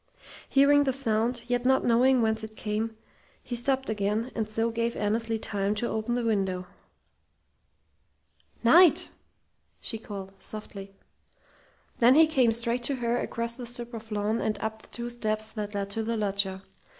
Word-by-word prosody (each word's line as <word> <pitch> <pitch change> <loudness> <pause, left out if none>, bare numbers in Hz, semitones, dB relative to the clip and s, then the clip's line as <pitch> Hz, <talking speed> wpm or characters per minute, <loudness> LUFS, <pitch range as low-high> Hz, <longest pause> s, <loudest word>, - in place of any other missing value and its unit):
Hearing 285 +1 +5
the 265 - +1
sound, 235 -2 0
yet 245 0 0
not 265 +1 +3
knowing 245 +1 +4
whence 220 0 0
it 220 0 -8
came, 220 +1 -3 0.5
he 245 - -4
stopped 265 +2 +1
again, 215 +3 -1
and 220 -2 -2
so 225 +2 0
gave 230 +1 -1
Annesley 225 +2 0
time 205 -1 -1
to 235 +3 -1
open 220 +2 -2
the 245 - -1
window. 190 -4 0 2.0
"Knight!" 335 +8 +6 0.7
she 225 - -3
called, 195 -3 -8
softly. 195 -2 -9 1.0
Then 245 +2 +6
he 320 +1 +8
came 265 -7 +3
straight 235 +2 0
to 280 - -1
her 240 -1 0
across 235 0 -3
the 245 0 -8
strip 240 0 -6
of 225 -1 -8
lawn 210 +2 0
and 215 - -1
up 220 0 -4
the - - -18
two 240 0 -5
steps 215 -2 -2
that 210 -2 -5
led 200 0 -3
to 225 - -2
the 230 +1 -2
loggia. 195 -2 -1
225 Hz, 160 wpm, -28 LUFS, 215-240 Hz, 2.0 s, he